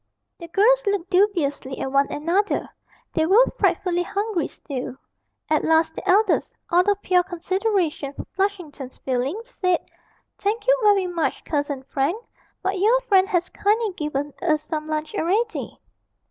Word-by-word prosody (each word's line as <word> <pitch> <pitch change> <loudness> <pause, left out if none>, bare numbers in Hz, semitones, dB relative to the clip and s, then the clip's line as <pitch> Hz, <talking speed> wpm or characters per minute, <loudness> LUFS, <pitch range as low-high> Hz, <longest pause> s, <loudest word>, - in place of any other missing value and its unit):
The 335 - -8
girls 475 +8 +4
looked 390 -3 -1
dubiously 335 -9 +1
at 265 - -3
one 275 +1 +3
another 345 +8 0 0.5
they 320 0 +1
were 435 +7 +6
frightfully 355 -2 +1
hungry 395 -2 -1
still; 255 -3 -6 0.5
at 310 -1 +1
last 320 0 +3
the - - -6
eldest, 405 +2 +3 0.2
out 355 +3 +4
of 405 0 +2
pure 360 -1 +4
consideration 360 -4 -1
for - - -7
Flushington's 355 -9 -3
feelings, 275 - -2
said, 365 -3 +1 0.6
'Thank 420 +3 -1
you - - +5
very 410 -3 +4
much, 335 -6 -2
Cousin 285 -3 -2
Frank 275 +7 -1 0.5
but 380 0 -1
your 450 +6 +4
friend 390 -5 +3
has 360 -3 0
kindly 425 0 +1
given 295 -3 -3
us 310 -4 +1
some 305 0 -4
lunch 310 +4 -3
already.' 425 +5 -1
355 Hz, 145 wpm, -23 LUFS, 305-405 Hz, 0.6 s, were